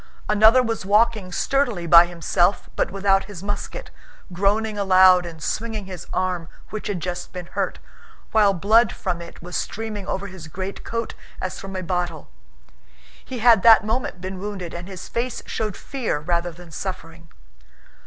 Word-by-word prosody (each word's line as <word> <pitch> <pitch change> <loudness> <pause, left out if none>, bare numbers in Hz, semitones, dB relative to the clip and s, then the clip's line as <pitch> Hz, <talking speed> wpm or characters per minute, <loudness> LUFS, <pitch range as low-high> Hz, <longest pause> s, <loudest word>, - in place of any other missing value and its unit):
Another 220 +4 +6
was 225 -3 -2
walking 210 -1 +2
sturdily 240 -3 0
by 170 +1 +8
himself 175 +2 0
but - - 0
without 195 0 +2
his 195 -3 -9
musket, 205 - -5 0.4
groaning 210 +4 +1
aloud 185 -2 +5
and 160 -2 -9
swinging 220 -2 -3
his 185 -2 -8
arm 180 -3 -1 0.2
which 215 - -5
had 200 -4 -2
just 175 +1 -5
been 180 -1 -6
hurt, - - -3 0.5
while 210 -2 +5
blood 215 +5 +4
from 175 -2 -3
it 170 0 -11
was 180 +1 -7
streaming 215 -3 -4
over 195 - -2
his 185 -5 -9
greatcoat 195 +7 -5 0.3
as 185 0 -4
from 195 0 -8
a 185 - -3
bottle. 175 - -3 0.9
He 255 - -6
had 230 -3 +6
that 225 0 +7
moment 220 -3 -2
been 185 +1 -6
wounded 190 -4 -5
and 175 +1 -7
his 190 -2 -8
face 240 +1 -3
showed 215 -4 -3
fear 255 - -3
rather 170 +2 -1
than 170 0 -14
suffering. 165 -2 -7
190 Hz, 160 wpm, -23 LUFS, 175-215 Hz, 0.9 s, by